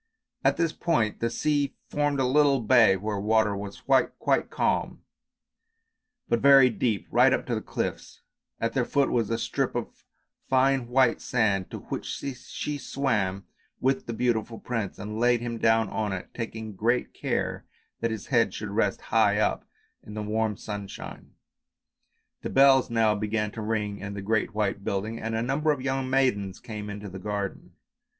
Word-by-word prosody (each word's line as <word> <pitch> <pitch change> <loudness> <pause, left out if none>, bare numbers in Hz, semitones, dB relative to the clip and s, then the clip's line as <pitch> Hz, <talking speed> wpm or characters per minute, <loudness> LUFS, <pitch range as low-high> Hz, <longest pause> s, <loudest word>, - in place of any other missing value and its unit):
At 135 +1 +3
this 165 -1 +1
point 135 -13 0
the 115 - 0
sea 145 +3 0
formed 145 -1 0
a 130 - +2
little 140 +1 +4
bay 110 -4 +5
where 105 +2 -3
the - - -3
water 105 -1 +2
was 100 0 -7
quite 135 -1 +1
calm, - - -1 1.2
but 120 - +1
very 135 -1 +7
deep, 110 -2 -1
right - - +5
up - - 0
to - - -2
the - - -1
cliffs; - - -5 0.4
at 115 0 -1
their 130 - +1
foot 140 +3 +1
was 115 -4 +1
a 115 - 0
strip 115 - -2
of - - -5 0.5
fine 130 -1 +3
white 125 -1 +3
sand 105 -6 +1
to - - -6
which - - -5
she 140 +2 -5
swam 105 -9 -1 0.3
with 135 0 0
the 120 - -3
beautiful 115 -1 -1
prince, 115 -6 -4
and 105 +1 -5
laid 120 0 +3
him 120 -1 -4
down 115 -1 +3
on 105 -1 -2
it, 90 - -6
taking 110 -2 -5
great 115 +6 0
care - - -2 0.3
that 115 - 0
his 110 -3 -5
head 115 -6 +3
should 105 -2 -5
rest 100 -1 0
high 105 -2 +4
up 105 - 0 0.4
in 105 - -10
the 105 - -3
warm 110 0 -1
sunshine. 100 -2 -8 1.1
The - - -4
bells 135 -1 +5
now 115 -2 +3
began 105 0 -1
to 110 - -6
ring 105 -2 -2
in 100 0 -6
the 100 - -5
great 110 0 0
white 100 -2 -1
building 105 +4 -2
and 115 0 -3
a 115 - 0
number 140 +5 0
of 145 - -1
young 130 0 -2
maidens 100 -8 +1
came 105 -2 -7
into 105 0 -6
the 95 0 -8
garden. 100 0 -4
115 Hz, 175 wpm, -27 LUFS, 105-130 Hz, 1.2 s, very